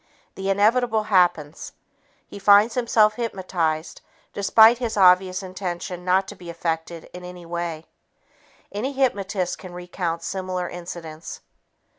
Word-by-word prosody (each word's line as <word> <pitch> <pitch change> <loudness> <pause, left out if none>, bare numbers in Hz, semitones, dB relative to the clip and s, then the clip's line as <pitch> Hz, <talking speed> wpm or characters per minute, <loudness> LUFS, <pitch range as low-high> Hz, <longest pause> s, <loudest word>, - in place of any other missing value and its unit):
The 195 0 -4
inevitable 220 +3 +2
happens. 180 - +1 0.5
He 200 - -10
finds 205 +3 +5
himself 225 -3 +3
hypnotized 180 -8 -2 0.3
despite 220 +4 +5
his 230 -3 -3
obvious 185 0 +4
intention 180 -1 -5
not 185 +1 +2
to 210 - -9
be 180 -2 -11
affected 165 0 -4
in 180 0 -9
any 180 -1 -10
way. 170 -1 -4 0.9
Any 245 +7 -3
hypnotist 200 -8 -1
can 185 -2 -10
recount 175 -1 -4
similar 185 -2 -3
incidents. 170 -2 -8
185 Hz, 120 wpm, -23 LUFS, 175-210 Hz, 0.9 s, finds